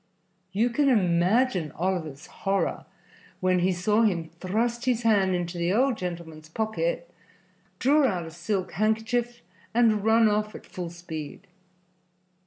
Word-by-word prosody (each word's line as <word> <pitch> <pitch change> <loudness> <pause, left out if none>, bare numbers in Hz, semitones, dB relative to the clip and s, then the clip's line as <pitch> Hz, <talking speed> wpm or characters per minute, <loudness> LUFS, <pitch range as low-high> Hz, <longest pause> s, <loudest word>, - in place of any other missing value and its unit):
You 225 +5 +1
can 280 +3 +2
imagine 185 - +2
Oliver's 160 -5 -3
horror 195 0 -2 0.5
when 185 0 +2
he 180 +2 +2
saw 210 +5 +2
him 175 -7 +1
thrust 235 +6 -1
his 245 -2 +1
hand 200 -5 +3
into 175 0 -3
the 170 +1 +1
old 255 +5 +3
gentleman's 170 -4 -7
pocket, 170 -4 -2 0.7
draw 285 +4 +4
out 180 -7 -2
a 160 - -8
silk 180 +3 -3
handkerchief 230 +3 -1 0.3
and 225 -4 +3
run 225 +1 +5
off 210 0 0
at - - -10
full 180 -4 -6
speed. 165 0 -8
195 Hz, 135 wpm, -26 LUFS, 175-225 Hz, 0.7 s, run